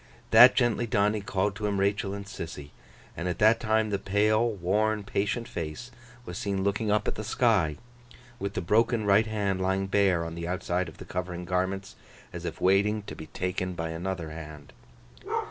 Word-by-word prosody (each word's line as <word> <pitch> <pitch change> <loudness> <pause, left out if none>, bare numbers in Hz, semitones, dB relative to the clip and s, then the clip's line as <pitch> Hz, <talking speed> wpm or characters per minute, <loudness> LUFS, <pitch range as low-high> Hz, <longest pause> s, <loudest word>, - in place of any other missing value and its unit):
That - - +9
gently 120 0 +1
done, 105 -1 +2
he 105 - -2
called 100 0 -1
to 105 0 -2
him 100 -1 -1
Rachael 100 0 0
and 100 -1 -7
Sissy. 80 -7 -8 0.4
And 85 - -4
at 90 - -2
that 110 +2 +5
time 110 -1 +1
the 100 - 0
pale, 105 +4 +2
worn, 105 +2 0
patient 105 +4 -2
face 85 +6 -6 0.3
was 90 - -6
seen 100 -2 -1
looking 100 +2 0
up 105 +1 +1
at - - 0
the 105 - -6
sky, 105 - +2 0.6
with 100 +1 -4
the - - -1
broken 110 +4 +2
right 105 +2 +4
hand 100 -3 -1
lying 95 +1 0
bare 95 -4 +2
on 80 - -6
the 85 0 -5
outside 90 0 -1
of - - -15
the - - -10
covering 90 -1 -4
garments, 95 +2 -2 0.4
as - - -6
if - - -5
waiting 100 +3 +2
to - - -8
be 80 - -9
taken 90 +5 -3
by 80 -1 -3
another 85 -1 -4
hand. 75 -2 -10
100 Hz, 190 wpm, -28 LUFS, 90-105 Hz, 0.6 s, That